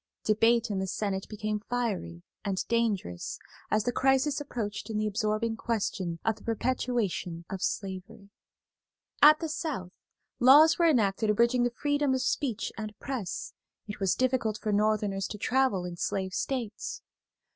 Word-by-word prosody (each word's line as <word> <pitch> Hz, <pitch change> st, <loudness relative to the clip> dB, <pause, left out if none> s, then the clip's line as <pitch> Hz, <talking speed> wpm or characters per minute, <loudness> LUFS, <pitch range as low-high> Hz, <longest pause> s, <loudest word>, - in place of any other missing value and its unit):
Debate 225 Hz, +1 st, +3 dB
in 195 Hz, -, -1 dB
the 190 Hz, -, -2 dB
Senate 190 Hz, 0 st, -2 dB
became 215 Hz, 0 st, -2 dB
fiery 205 Hz, -, -3 dB, 0.2 s
and 195 Hz, -3 st, -2 dB
dangerous 215 Hz, -, -1 dB, 0.3 s
as 215 Hz, 0 st, +2 dB
the 245 Hz, -, 0 dB
crisis 270 Hz, +3 st, +2 dB
approached 225 Hz, -7 st, -4 dB
in 220 Hz, -, -2 dB
the 215 Hz, -, 0 dB
absorbing 215 Hz, +2 st, 0 dB
question 200 Hz, -7 st, -2 dB
of 225 Hz, -1 st, +1 dB
the -, -, -17 dB
perpetuation 225 Hz, -7 st, -1 dB
of 190 Hz, -1 st, -4 dB
slavery. 200 Hz, +2 st, -4 dB, 0.9 s
At 305 Hz, +1 st, +8 dB
the 325 Hz, -, -2 dB
South 300 Hz, -, -4 dB, 0.5 s
laws 295 Hz, +7 st, +7 dB
were 340 Hz, -1 st, +5 dB
enacted 215 Hz, -5 st, +2 dB
abridging 235 Hz, +4 st, +3 dB
the -, -, +2 dB
freedom 290 Hz, +2 st, 0 dB
of 255 Hz, -, -1 dB
speech 245 Hz, -7 st, -1 dB
and 215 Hz, -1 st, -6 dB
press; 255 Hz, -9 st, -4 dB, 0.3 s
it 205 Hz, -, -7 dB
was 195 Hz, -2 st, +2 dB
difficult 250 Hz, -4 st, +1 dB
for 215 Hz, -, -2 dB
Northerners 205 Hz, -2 st, +1 dB
to 210 Hz, -, -6 dB
travel 245 Hz, -5 st, +1 dB
in 175 Hz, -1 st, -6 dB
slave 190 Hz, +1 st, -2 dB
states. 230 Hz, -5 st, -3 dB
215 Hz, 150 wpm, -29 LUFS, 200-250 Hz, 0.9 s, At